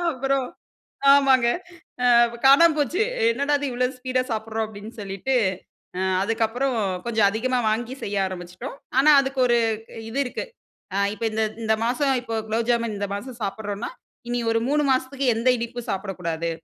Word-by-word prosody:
அப்புறம் 270 Hz, 0 st, 0 dB, 0.7 s
ஆமாங்க. 265 Hz, -3 st, +4 dB, 0.6 s
அ -, -, +3 dB, 0.4 s
காணாம 315 Hz, +4 st, +7 dB
போச்சு 325 Hz, -, +1 dB, 0.3 s
"என்னடா! 280 Hz, +5 st, 0 dB
இது 280 Hz, -3 st, -2 dB
இவ்ளோ 250 Hz, +1 st, +1 dB
ஸ்பீடா 255 Hz, 0 st, -1 dB
சாப்பிட்றோம்" 220 Hz, 0 st, -2 dB
அப்டின்னு 215 Hz, +2 st, -10 dB
சொல்லிட்டு 200 Hz, +7 st, -2 dB, 0.6 s
அ -, -, -2 dB, 0.2 s
அதுக்கப்புறம் 230 Hz, +4 st, 0 dB, 0.3 s
கொஞ்சம் 220 Hz, -3 st, +3 dB
அதிகமா 250 Hz, +4 st, 0 dB
வாங்கி 235 Hz, +3 st, -2 dB
செய்ய 200 Hz, 0 st, -2 dB
ஆரம்ப்ச்சுட்டோம். 185 Hz, +8 st, -7 dB, 0.2 s
ஆனா 300 Hz, +2 st, +6 dB
அதுக்கு 270 Hz, 0 st, -4 dB
ஒரு 240 Hz, -, +3 dB, 0.5 s
இது 270 Hz, -, -3 dB
இருக்கு. 250 Hz, -, -4 dB, 0.5 s
ஆ 200 Hz, -, 0 dB, 0.2 s
இப்ப 220 Hz, +2 st, -6 dB
இந்த 220 Hz, +1 st, 0 dB, 0.2 s
இந்த 220 Hz, 0 st, +3 dB
மாசம் 270 Hz, +3 st, +1 dB
இப்போ 225 Hz, -2 st, -4 dB
குலோப்ஜாமுன் 230 Hz, 0 st, 0 dB
இந்த 200 Hz, -, -2 dB
மாசம் 245 Hz, +3 st, -8 dB
சாப்பிட்றோன்னா, 205 Hz, -, -4 dB, 0.4 s
இனி 245 Hz, 0 st, -1 dB
ஒரு 225 Hz, -, +1 dB
3 295 Hz, +1 st, +2 dB
மாசத்துக்கு 260 Hz, +1 st, -1 dB
எந்த 235 Hz, +3 st, +1 dB
இனிப்பும் 235 Hz, +1 st, -6 dB
சாப்பிடக்கூடாது. 180 Hz, -4 st, -3 dB
235 Hz, 150 wpm, -24 LUFS, 215-265 Hz, 0.7 s, காணாம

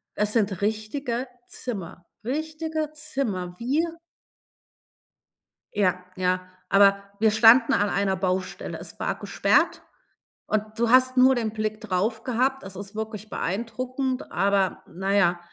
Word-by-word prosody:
Es 210 Hz, 0 st, 0 dB
sind 205 Hz, -5 st, +1 dB
richtige 235 Hz, +4 st, -2 dB, 0.2 s
Zimmer, 185 Hz, -7 st, -6 dB, 0.2 s
richtige 310 Hz, +3 st, -3 dB
Zimmer. 230 Hz, -13 st, -3 dB
Wir 320 Hz, +7 st, 0 dB, 1.8 s
Ja, 185 Hz, -3 st, +1 dB
ja, 185 Hz, 0 st, +1 dB, 0.3 s
aber 200 Hz, 0 st, +5 dB, 0.2 s
wir 220 Hz, -1 st, +4 dB
standen 230 Hz, +5 st, +6 dB
an 205 Hz, -3 st, +2 dB
einer 195 Hz, -1 st, +1 dB
Baustelle. 185 Hz, 0 st, -2 dB
Es -, -, -8 dB
war -, -, -1 dB
gesperrt -, -, +2 dB, 0.6 s
und 215 Hz, 0 st, -2 dB
du 235 Hz, 0 st, +1 dB
hast 255 Hz, +1 st, +5 dB
nur 260 Hz, +1 st, +6 dB
den 225 Hz, -3 st, -1 dB
Blick 215 Hz, 0 st, -2 dB
drauf 220 Hz, +3 st, -1 dB
gehabt. 260 Hz, +1 st, 0 dB
Es 190 Hz, 0 st, -9 dB
ist 200 Hz, +2 st, -8 dB
wirklich 220 Hz, 0 st, -5 dB
beeindruckend, 255 Hz, +6 st, -3 dB
aber 195 Hz, -1 st, +1 dB
na 190 Hz, +3 st, -2 dB
ja, 175 Hz, -3 st, +3 dB
215 Hz, 130 wpm, -25 LUFS, 195-255 Hz, 1.8 s, standen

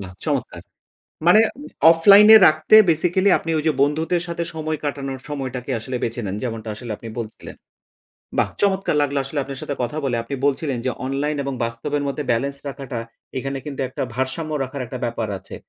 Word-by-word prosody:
বাহ! 95 Hz, -2 st, -8 dB
চমৎকার! -, -, -2 dB, 0.7 s
মানে 195 Hz, +5 st, +7 dB
এ 290 Hz, +6 st, -10 dB, 0.2 s
অফলাইন 200 Hz, +5 st, +7 dB
এ -, -, +12 dB
রাখতে 155 Hz, +6 st, +4 dB
বেসিক্যালি 180 Hz, +5 st, +2 dB
আপনি -, -, -7 dB
ওইযে 155 Hz, +1 st, +1 dB
বন্ধুদের 160 Hz, +4 st, +1 dB
সাথে 170 Hz, 0 st, -3 dB
সময় 155 Hz, 0 st, -3 dB
কাটানোর 135 Hz, -2 st, -4 dB
সময়টাকে 135 Hz, -3 st, -4 dB
আসলে 125 Hz, +3 st, -4 dB
বেছে 115 Hz, +1 st, -2 dB
নেন 95 Hz, 0 st, -3 dB
যেমনটা 115 Hz, -2 st, -4 dB
আসলে 115 Hz, +1 st, -7 dB
আপনি 115 Hz, -, -10 dB
বলছিলেন। 110 Hz, -1 st, -8 dB, 0.8 s
বাহ! -, -, +2 dB
চমৎকার 195 Hz, -5 st, +1 dB
লাগলো 140 Hz, 0 st, 0 dB
আসলে 145 Hz, +2 st, -4 dB
আপনার 135 Hz, 0 st, -7 dB
সাথে 145 Hz, -, -4 dB
কথা 150 Hz, +5 st, -3 dB
বলে। 125 Hz, -3 st, 0 dB
আপনি 140 Hz, -, -5 dB
বলছিলেন 140 Hz, -1 st, 0 dB
যে 130 Hz, -, +1 dB
অনলাইন 140 Hz, +3 st, -1 dB
এবং 140 Hz, 0 st, -3 dB
বাস্তবের 115 Hz, +5 st, -2 dB
মধ্যে 140 Hz, +1 st, -3 dB
বেলেন্স 140 Hz, +4 st, -1 dB
রাখাটা 135 Hz, -3 st, -5 dB, 0.4 s
এখানে 135 Hz, +1 st, -3 dB
কিন্তু 140 Hz, -2 st, -5 dB
একটা -, -, -6 dB
ভারসাম্য 130 Hz, +5 st, -2 dB
রাখার 135 Hz, +1 st, -6 dB
একটা 125 Hz, +2 st, -6 dB
ব্যাপার 115 Hz, -1 st, -3 dB
আছে। -, -, -10 dB
140 Hz, 180 wpm, -21 LUFS, 130-155 Hz, 0.8 s, এ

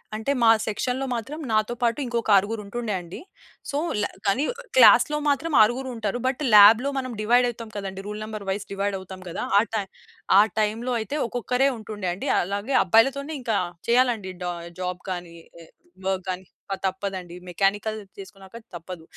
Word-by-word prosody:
అంటే 220 Hz, +5 st, -2 dB
మా 230 Hz, -, +6 dB, 0.2 s
సెక్షన్‌లో 250 Hz, +5 st, -2 dB
మాత్రం 255 Hz, +7 st, -5 dB
నాతో 215 Hz, +2 st, +1 dB
పాటు 235 Hz, +2 st, +1 dB
ఇంకొక 235 Hz, -2 st, -2 dB
ఆరుగురు 205 Hz, +3 st, +1 dB
ఉంటుండే 225 Hz, +1 st, -4 dB
అండి. 170 Hz, 0 st, -9 dB, 0.5 s
సో, 285 Hz, -, -2 dB, 0.2 s
ల -, -, +1 dB, 0.2 s
కానీ 250 Hz, +9 st, +2 dB, 0.3 s
క్లాస్‌లో 300 Hz, -10 st, +7 dB
మాత్రం 295 Hz, +3 st, 0 dB
ఆరుగురు 250 Hz, +5 st, +2 dB
ఉంటారు. 225 Hz, +1 st, -2 dB
బట్ 265 Hz, +2 st, -2 dB
ల్యాబ్‌లో 225 Hz, +7 st, +8 dB
మనం 255 Hz, -1 st, -5 dB
డివైడ్ 245 Hz, +3 st, +4 dB
అయితాం 230 Hz, -1 st, -8 dB
కదండీ. 195 Hz, -1 st, -5 dB
రూల్ 210 Hz, +1 st, -5 dB
నంబర్ 215 Hz, -2 st, -7 dB
వైస్ 200 Hz, +1 st, -3 dB
డివైడ్ 200 Hz, 0 st, -1 dB
అవుతాం 190 Hz, 0 st, -10 dB
కదా! 170 Hz, -, -4 dB
ఆ -, -, +5 dB
టైమ్ 205 Hz, -3 st, -1 dB, 0.7 s
టైమ్‌లోఅయితే 230 Hz, +4 st, -2 dB
ఒక్కొక్కరే 250 Hz, +3 st, +1 dB
ఉంటుండే 210 Hz, -4 st, -5 dB
అండి. 180 Hz, -, -6 dB
అలాగే 200 Hz, +8 st, -2 dB
అబ్బాయిలతోనే 270 Hz, -, +2 dB
ఇంకా 230 Hz, -3 st, -1 dB, 0.3 s
చేయాలండి 235 Hz, -5 st, +2 dB
డ -, -, -3 dB, 0.4 s
జాబ్ 180 Hz, 0 st, -3 dB
గాని, 175 Hz, -2 st, -6 dB, 0.3 s
ఆహ్, 165 Hz, -, -16 dB, 0.4 s
వర్క్ 190 Hz, -1 st, -1 dB
గాని, 185 Hz, 0 st, -4 dB, 0.2 s
ప -, -, -1 dB
తప్పదండి 190 Hz, -2 st, -4 dB
మెకానికల్ 200 Hz, +4 st, 0 dB, 0.2 s
చేసుకున్నాక 195 Hz, +1 st, -11 dB, 0.2 s
తప్పదు. 175 Hz, 0 st, -8 dB
215 Hz, 155 wpm, -24 LUFS, 195-245 Hz, 0.7 s, ల్యాబ్‌లో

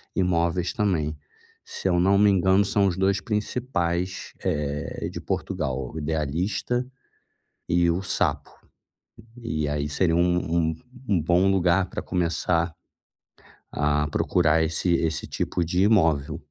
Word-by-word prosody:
imóveis 90 Hz, -1 st, +1 dB
também. 85 Hz, -9 st, 0 dB, 0.5 s
Se -, -, -4 dB
eu 90 Hz, -, +2 dB
não 95 Hz, +2 st, +4 dB
me 105 Hz, 0 st, +5 dB
engano 95 Hz, +1 st, +4 dB
são 100 Hz, 0 st, +1 dB
os 90 Hz, -, -1 dB
2 95 Hz, 0 st, +2 dB
principais, 95 Hz, -5 st, -2 dB
eh, 75 Hz, -1 st, -2 dB
de -, -, -6 dB
Portugal, 65 Hz, -9 st, -3 dB
o -, -, -8 dB
Idealista 80 Hz, -, -1 dB, 0.8 s
e 85 Hz, 0 st, +3 dB
o 90 Hz, +3 st, -1 dB
Sapo, 95 Hz, -, -1 dB, 0.9 s
e 75 Hz, -10 st, -2 dB
aí 75 Hz, 0 st, -2 dB
seria 80 Hz, +3 st, +1 dB
um 90 Hz, 0 st, +3 dB, 0.3 s
um -, -, -4 dB, 0.3 s
um 90 Hz, -6 st, +2 dB
bom 90 Hz, +4 st, +3 dB
lugar 95 Hz, 0 st, +2 dB
para -, -, -5 dB
começar 85 Hz, -1 st, 0 dB, 1.0 s
a 75 Hz, 0 st, +1 dB
procurar 80 Hz, 0 st, +2 dB
esse 80 Hz, +2 st, +1 dB
esse 80 Hz, -1 st, -1 dB
tipo 90 Hz, -, -2 dB
de 90 Hz, +3 st, +1 dB
imóvel. 80 Hz, -9 st, +2 dB
85 Hz, 130 wpm, -25 LUFS, 80-95 Hz, 1.0 s, me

